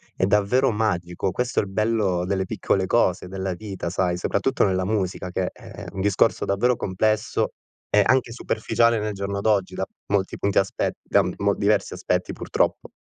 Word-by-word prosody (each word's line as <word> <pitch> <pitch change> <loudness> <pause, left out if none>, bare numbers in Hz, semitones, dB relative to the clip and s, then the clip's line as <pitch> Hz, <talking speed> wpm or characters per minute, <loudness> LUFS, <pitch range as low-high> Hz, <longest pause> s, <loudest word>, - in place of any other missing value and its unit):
e 95 - +1
davvero 105 +7 +3
magico, 95 -4 -1
questo 125 +6 -1
è - - +2
il 100 - -7
bello 105 -3 +1
delle 95 0 -1
piccole 95 -1 0
cose, 90 -3 +1
della 95 0 -3
vita 95 -2 -5
sai, 90 0 0
soprattutto 115 +9 0
nella 95 -2 0
musica 95 -3 -2
che 90 0 -1
è - - -10
un 95 - -5
discorso 100 -1 +2
davvero 120 +6 +2
complesso 110 +2 0 0.4
e 105 0 +5
anche 130 -2 +2
superficiale 115 -1 +1
nel 105 0 -2
giorno 100 0 -3
d'oggi, 100 -3 +1
da 95 - -2 0.2
molti 100 -2 0
punti 100 -1 +2
aspet 95 - -1
da - - +3
mol - - +1
diversi - - +1
aspetti - - -1
purtroppo. - - -1
100 Hz, 170 wpm, -24 LUFS, 95-110 Hz, 0.4 s, e